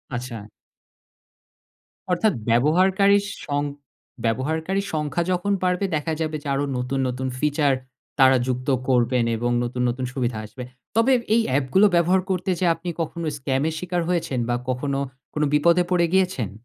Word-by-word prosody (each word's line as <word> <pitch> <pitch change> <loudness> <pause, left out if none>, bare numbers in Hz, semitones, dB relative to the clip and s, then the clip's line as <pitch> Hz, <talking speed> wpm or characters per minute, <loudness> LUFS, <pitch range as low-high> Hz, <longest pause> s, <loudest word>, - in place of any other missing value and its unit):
আচ্ছা। 115 -4 -6 1.6
অর্থাৎ 205 +3 +2 0.2
ব্যবহারকারীর 190 - +4 0.2
সং 145 0 -1 0.6
ব্যবহারকারীর 160 - -1
সংখ্যা 150 +2 -1
যখন 180 +3 0
বাড়বে 180 +2 +1
দেখা 155 +2 -1
যাবে 155 -1 -2
যে - - -7
আরো 140 +1 0
নতু্‌ন, 130 +2 -1
নতুন 130 +1 -3
feature 145 -2 +2 0.4
তারা 130 0 +6
যুক্ত 125 +1 -2 0.2
করবেন 125 -1 +2
এবং 120 +1 -1
নতু্‌ন, 125 +1 -2
নতুন 130 +1 -3
সুবিধা 120 -4 -1
আসবে। 125 +4 -9 0.3
তবে 235 +4 +4 0.2
এই 230 - +4 0.2
app 140 - 0
গুলো 205 +2 +7
ব্যবহার 180 +2 +3
করতে 185 0 -1
যেয়ে, 170 -3 +3
আপনি 170 +2 -6
কখনো 165 +1 -4
scam 135 0 -1
এর 160 - -5
শিকার 180 -1 -2
হয়েছেন 160 -8 -1
বা 120 - +2
কখনো 135 +2 -1 0.3
কোনো 150 0 +1
বিপদে 170 +4 +4
পড়ে 170 -1 +3
গিয়েছেন? 180 - +1
150 Hz, 150 wpm, -23 LUFS, 130-180 Hz, 1.6 s, গুলো